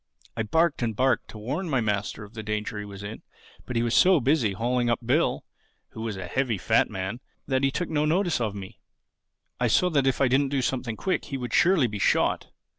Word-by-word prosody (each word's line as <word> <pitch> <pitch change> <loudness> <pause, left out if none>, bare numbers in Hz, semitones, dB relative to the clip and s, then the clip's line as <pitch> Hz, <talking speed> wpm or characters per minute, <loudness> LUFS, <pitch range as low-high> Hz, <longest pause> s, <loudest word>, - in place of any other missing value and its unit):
"I 115 - -1
barked 160 +8 +1
and 115 -3 -1
barked 130 0 +1
to - - -11
warn 145 - -3
my 135 -4 +2
master 105 -1 -2
of 105 +1 -13
the 110 - -6
danger 105 0 -3
he 105 - -5
was 100 -1 -9
in; 105 +2 -7 0.5
but 125 - -5
he 115 - +2
was 120 -1 0
so 185 -2 +6
busy 130 -5 +2
hauling 120 +3 0
up 120 - +1
Bill 145 +8 +1 0.4
(who 110 - -9
was 110 -3 -3
a 95 - -5
heavy 125 +2 -1
fat - - +2
man) 95 +5 -4 0.3
that 130 -1 0
he 135 - +4
took 175 +5 -2
no 150 -2 0
notice 175 -2 +1
of 105 -3 -1
me. 95 -2 -9 0.8
I 125 - +2
saw 180 +11 +3
that 140 -4 +2
if 135 - +1
I 135 - +4
didn't 135 +2 +2
do 135 -2 0
something 125 -3 -2
quick 190 - -1
he 135 - -4
would 125 -2 -5
surely 175 -6 +4
be 105 -3 -3
shot. - - +2
120 Hz, 230 wpm, -26 LUFS, 105-140 Hz, 0.8 s, so